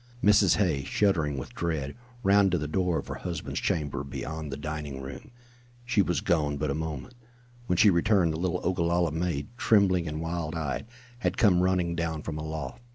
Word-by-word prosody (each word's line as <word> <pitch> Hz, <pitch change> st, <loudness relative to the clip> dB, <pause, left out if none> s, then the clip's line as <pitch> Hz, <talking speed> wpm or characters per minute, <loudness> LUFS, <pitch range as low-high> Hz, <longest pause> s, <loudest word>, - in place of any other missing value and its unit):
Mrs. 100 Hz, -4 st, +5 dB
Hay, 85 Hz, -8 st, +1 dB
shuddering 80 Hz, -6 st, +1 dB
with 65 Hz, -, -6 dB
dread, 80 Hz, -4 st, -2 dB, 0.3 s
ran 100 Hz, 0 st, +5 dB
to 90 Hz, -, +1 dB
the 75 Hz, -, -3 dB
door 90 Hz, +1 st, +1 dB
of -, -, -4 dB
her -, -, -4 dB
husband's 85 Hz, -3 st, -3 dB
chamber 70 Hz, -3 st, -1 dB
beyond 75 Hz, +2 st, -5 dB
the 70 Hz, -, -4 dB
dining 75 Hz, -2 st, -5 dB
room. 70 Hz, -, -8 dB, 0.6 s
She 120 Hz, -4 st, +3 dB
was 90 Hz, -2 st, 0 dB
gone 75 Hz, -5 st, +1 dB
but 75 Hz, 0 st, -1 dB
a -, -, 0 dB
moment. 80 Hz, -, -5 dB, 0.5 s
When 90 Hz, -, +1 dB
she 105 Hz, +2 st, +7 dB
returned 90 Hz, -2 st, +3 dB
the 80 Hz, -, -4 dB
little 90 Hz, 0 st, -1 dB
Ogalalla 85 Hz, -2 st, +1 dB
maid, 80 Hz, -3 st, -2 dB
trembling 95 Hz, -7 st, +3 dB
and 75 Hz, 0 st, -4 dB
wild 80 Hz, 0 st, -3 dB
eyed, 80 Hz, +5 st, -3 dB, 0.3 s
had -, -, -1 dB
come 95 Hz, -6 st, +5 dB
running 90 Hz, -2 st, +1 dB
down 80 Hz, -2 st, -2 dB
from 75 Hz, -2 st, -4 dB
aloft. 80 Hz, -, -5 dB
85 Hz, 185 wpm, -28 LUFS, 75-90 Hz, 0.6 s, she